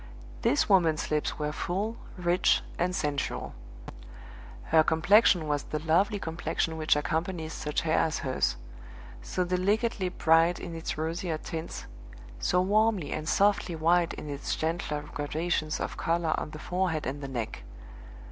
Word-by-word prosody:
This 145 - +2
woman's 165 -8 +3
lips 150 -1 0
were 150 -1 -2
full, 200 +8 -2 0.2
rich, 175 0 +2 0.2
and 180 +1 +1
sensual. 145 -4 -2 1.1
Her 160 - +4
complexion 175 +1 +4
was 145 -1 0
the 155 - -3
lovely 170 +7 +2
complexion 160 -2 -2
which 155 -1 +2
accompanies 160 +2 -2
such 150 0 -2
hair 160 -1 +2
as 160 -1 +1
hers 130 -1 0 0.6
so 180 - -2
delicately 190 +2 0
bright 165 0 +3
in 170 - -6
its 165 -1 -4
rosier 165 +1 -2
tints, 160 +1 -6 0.5
so 180 - +2
warmly 205 -3 +2
and 155 +1 -3
softly 200 -3 +2
white 170 +2 +2
in - - -8
its 145 -1 -3
gentler 160 -2 -2
gradations 155 +1 -1
of - - -4
color 165 -1 +1
on - - -4
the 155 - -8
forehead 175 -1 -1
and 140 +3 -4
the 140 - -5
neck. 120 - -4
165 Hz, 145 wpm, -28 LUFS, 155-180 Hz, 1.1 s, Her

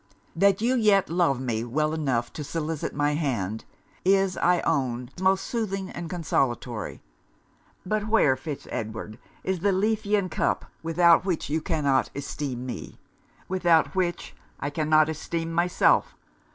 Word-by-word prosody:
'That 195 +3 +3
you 245 +2 +3
yet 205 -7 +3
love 170 -7 +2
me 115 -4 -2
well 150 +6 0
enough 130 -7 -1
to 150 - -5
solicit 155 +1 -3
my 145 0 +2
hand, 115 - -2 0.4
is 195 0 +3
I 180 0 +3
own 125 -5 -1
most 190 0 +3
soothing 195 -5 -3
and 170 -1 -6
consolatory: 125 - -2 0.8
but 215 +2 -1
where, 215 -12 +4
Fitz 140 +2 -7
Edward, 110 -1 -5 0.2
is 190 -1 -1
the 200 +4 +2
Lethean 205 0 +1
cup, 175 - -1 0.2
without 170 +1 +4
which 180 -6 -2
you 160 +1 +1
cannot 145 -6 +1
esteem 140 -3 -4
me? 120 -5 -7 0.5
without 175 -4 +3
which, 180 -2 -2 0.2
I 140 - -3
cannot 155 0 +3
esteem 165 +1 -3
myself? 175 +1 +2
160 Hz, 140 wpm, -26 LUFS, 135-185 Hz, 0.8 s, where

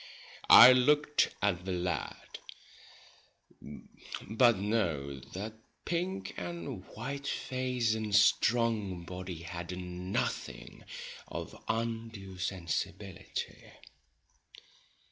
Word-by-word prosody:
I 125 +2 +12
looked 150 +4 +3
at 90 -4 +1
the 95 0 -3
lad; 90 -4 -4 1.9
but 115 +2 +4
no, 85 -10 -1
that 95 - -7 0.3
pink 185 +3 -2
and 85 -1 -5
white 140 +1 -5
face 125 -4 -1
and 110 -2 -1
strong 105 -4 +3
body 90 -2 -7
had 85 +1 -6
nothing 90 +1 -4 0.4
of - - -6
undue 115 -4 -3
sensibility. 90 0 -4
100 Hz, 80 wpm, -31 LUFS, 90-115 Hz, 1.9 s, I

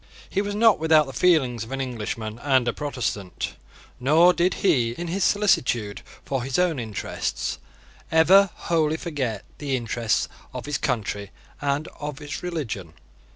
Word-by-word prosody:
He 200 - 0
was 205 0 -3
not 225 -1 +5
without 160 -1 +5
the 135 - -8
feelings 130 -11 +3
of 110 - -10
an 135 - -3
Englishman 115 -3 -4
and 130 -2 +2
a 120 - +1
Protestant; 125 -10 -3 0.5
nor 160 +7 +5
did 180 +1 +1
he, 125 -11 +3
in 175 0 -4
his 190 +2 0
solicitude 125 - +2 0.2
for 135 -2 -1
his 130 +1 -2
own 175 -6 +2
interests, 110 -4 -3 0.5
ever 185 +5 +6
wholly 160 -2 0
forget 135 - -3
the 140 -3 -1
interests 115 -2 0 0.3
of - - -5
his 145 -1 -2
country 105 -5 -2 0.3
and 145 +2 0
of 145 -1 -5
his 145 0 -6
religion. 125 - -4
140 Hz, 155 wpm, -24 LUFS, 120-170 Hz, 0.5 s, ever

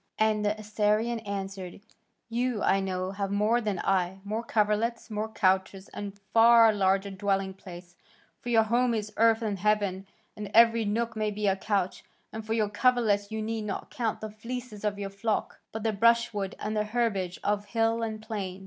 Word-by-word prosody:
And 215 -1 +2
the 210 +1 0
Assyrian 215 +2 0
answered, 195 -3 -6 0.5
"You, 240 -1 -1
I 195 - +3
know, 185 -1 -2
have 195 0 -3
more 210 +4 +2
than 210 -4 -2
I, 185 -1 +1
more 215 +3 -3
coverlets, 225 +1 0
more 215 +1 -2
couches, 190 -1 0
and 205 -1 -6
a 200 - -27
far 230 -1 +7
larger 195 0 +1
dwelling 195 0 -1
place, 175 -2 -12 0.4
for 245 - -7
your 225 -2 +5
home 240 +2 +1
is 210 -1 -4
earth 225 +1 +4
and 205 -3 -2
heaven, 200 -2 0 0.3
and 210 -1 -6
every 230 -1 +6
nook 230 +3 -1
may 215 -1 0
be 210 0 -3
a 195 -1 +3
couch, 195 -2 -2 0.3
and 220 0 -5
for 220 +1 -2
your 220 -2 +1
coverlets 210 -2 +2
you 220 0 -3
need 220 0 -3
not 200 - -5
count 235 -7 -2
the 215 -1 -5
fleeces 230 0 -7
of 205 -1 -1
your 200 -1 -5
flocks, 210 +2 -2
but 220 -1 -5
the 220 -1 +1
brushwood, 215 -2 +2
and 215 +1 -3
the 210 - +1
herbage 210 -5 -1
of 205 0 0
hill 225 +2 0
and 220 -1 -4
plain." 200 -4 -5
210 Hz, 185 wpm, -28 LUFS, 195-225 Hz, 0.5 s, far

